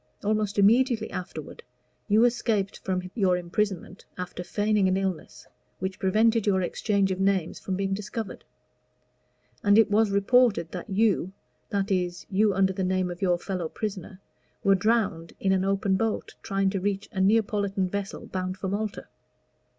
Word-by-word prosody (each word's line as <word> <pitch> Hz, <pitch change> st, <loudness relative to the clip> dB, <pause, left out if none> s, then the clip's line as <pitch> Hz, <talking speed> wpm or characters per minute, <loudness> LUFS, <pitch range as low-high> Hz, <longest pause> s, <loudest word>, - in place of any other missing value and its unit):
Almost 210 Hz, -1 st, 0 dB
immediately 230 Hz, +4 st, +3 dB
afterward 185 Hz, -, -7 dB, 0.5 s
you 220 Hz, +3 st, +5 dB
escaped 220 Hz, -4 st, 0 dB
from 185 Hz, -1 st, -3 dB
your 190 Hz, -5 st, +2 dB
imprisonment, 185 Hz, +1 st, -3 dB
after 180 Hz, 0 st, -5 dB
feigning 205 Hz, +1 st, +1 dB
an 185 Hz, 0 st, +2 dB
illness 190 Hz, -3 st, -4 dB, 0.3 s
which 190 Hz, 0 st, -4 dB
prevented 220 Hz, +3 st, +2 dB
your 190 Hz, -2 st, +2 dB
exchange 200 Hz, +1 st, 0 dB
of 185 Hz, -, -2 dB
names 195 Hz, -3 st, 0 dB
from 190 Hz, -, -3 dB
being 195 Hz, 0 st, -1 dB
discovered; 210 Hz, +2 st, -5 dB, 1.2 s
and 205 Hz, 0 st, +5 dB
it 220 Hz, -2 st, +5 dB
was 215 Hz, +1 st, +4 dB
reported 200 Hz, -2 st, +3 dB
that 180 Hz, +3 st, -7 dB
you 195 Hz, -2 st, +1 dB, 0.4 s
that 200 Hz, 0 st, -1 dB
is, 180 Hz, -2 st, -1 dB
you 205 Hz, +2 st, +3 dB
under 190 Hz, 0 st, +2 dB
the 190 Hz, -, -2 dB
name 185 Hz, -1 st, 0 dB
of 175 Hz, -, -9 dB
your 180 Hz, -2 st, +2 dB
fellow 175 Hz, -2 st, -4 dB
prisoner 195 Hz, -2 st, -5 dB, 0.4 s
were 195 Hz, -, +5 dB
drowned 195 Hz, -5 st, 0 dB
in 190 Hz, -, +1 dB
an 190 Hz, -1 st, +2 dB
open 195 Hz, 0 st, +1 dB
boat, 225 Hz, +1 st, -2 dB
trying 195 Hz, -1 st, 0 dB
to 195 Hz, -, -1 dB
reach 200 Hz, +1 st, -2 dB
a 190 Hz, -4 st, -2 dB
Neapolitan 200 Hz, -2 st, +2 dB
vessel 200 Hz, +1 st, -5 dB
bound 185 Hz, 0 st, -4 dB
for 190 Hz, 0 st, -3 dB
Malta. 205 Hz, +1 st, -3 dB
195 Hz, 160 wpm, -26 LUFS, 185-210 Hz, 1.2 s, you